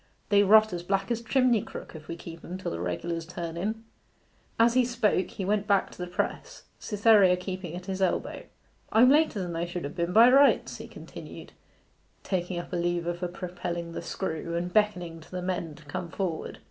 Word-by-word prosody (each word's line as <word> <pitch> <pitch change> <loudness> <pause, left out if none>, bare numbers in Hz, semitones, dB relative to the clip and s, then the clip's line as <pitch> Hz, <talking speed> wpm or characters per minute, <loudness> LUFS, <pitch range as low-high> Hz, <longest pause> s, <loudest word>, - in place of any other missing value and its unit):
'They 205 -1 +5
rot 215 +1 +6
as 175 - -3
black 195 +4 -1
as 235 - 0
a - - -13
chimney 250 -2 +3
crook - - -9
if 155 -1 -10
we 170 - -5
keep 165 0 -10
'em 180 - -6
till 190 - -4
the 85 - -4
regulars 165 - -3
turn 170 -1 -6
in.' 215 +6 -3 0.8
As 230 +1 +5
he 255 0 +4
spoke 235 -6 +1
he 195 - -5
went 205 +1 0
back 200 -2 +2
to - - -14
the 180 - -3
press, 175 - -4 0.2
Cytherea 205 -4 +4
keeping 180 -2 -5
at 180 0 -7
his 190 0 -4
elbow. 190 - -1 0.5
'I'm 245 +4 +6
later 300 -7 +3
than 175 -2 -5
I 170 +1 -1
should 175 0 -5
have 145 +1 -6
been 170 0 -1
by 225 +5 +8
rights,' 280 +2 +4
he - - -9
continued, - - -11 0.7
taking 180 -1 -2
up 175 - -6
a - - 0
lever 175 0 0
for 175 +1 -4
propelling 175 -1 -5
the - - -5
screw, 170 -2 -4
and 175 +1 -3
beckoning 180 -6 +1
to 160 - -16
the 185 - -4
men 175 -4 -3
to 155 - -16
come 170 +4 -5
forward. 175 -3 -3
180 Hz, 210 wpm, -28 LUFS, 170-210 Hz, 0.8 s, by